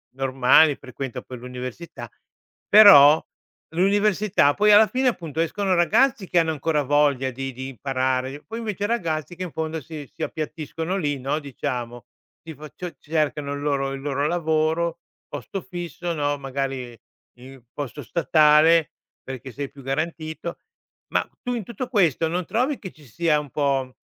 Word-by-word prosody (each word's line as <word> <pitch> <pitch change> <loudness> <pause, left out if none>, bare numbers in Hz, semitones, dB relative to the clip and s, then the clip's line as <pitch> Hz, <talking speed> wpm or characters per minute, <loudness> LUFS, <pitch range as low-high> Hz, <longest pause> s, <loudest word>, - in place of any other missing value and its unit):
normali, 135 +3 +4
frequenta 130 0 -7
poi 125 - -10
l'università, 125 +1 -8 0.6
però 160 -8 +9 0.5
l'università, 200 -3 +3
poi 210 +4 +4
alla 215 +1 +7
fine 255 0 +1
appunto 165 - -4
escono 190 +3 0
ragazzi 215 +4 +2
che 175 - +3
hanno 165 -1 +1
ancora 150 0 0
voglia 140 -2 +2
di 135 +2 -5
di 130 +2 -6
imparare 130 +1 -2
poi 225 +1 -6
invece 205 -3 -3
ragazzi 175 -7 -2
che 185 - -5
in 175 - -6
fondo 160 0 -4
si 150 -2 -9
si - - -6
appiattiscono 160 +3 -4
lì 145 -6 -1
no, 135 +4 -1
diciamo 125 -5 -5 0.4
tifo 155 -2 -10
cio 180 0 -7
cercano 150 -2 -2
il 145 - -5
loro 140 -2 -1
il 135 - -6
loro 140 0 -1
lavoro, 160 0 0 0.3
posto 145 +7 -6
fisso 175 -1 -5
no, 145 -2 -1
magari 135 -3 -4 0.4
il 130 +1 -13
posto 145 0 -6
statale, 155 +1 +4 0.3
perché 130 0 -8
sei 140 +2 -5
più 140 - -14
garantito, 160 +4 -4 0.5
ma - - +1 0.2
tu 245 - -2
in 230 - -4
tutto 235 +4 -6
questo 170 - +2
non 175 +1 -2
trovi 255 - 0
che 185 - -8
ci 155 - -20
sia 155 +4 +1
un 145 -2 -8
po' 135 -2 -1
155 Hz, 155 wpm, -23 LUFS, 135-175 Hz, 0.6 s, però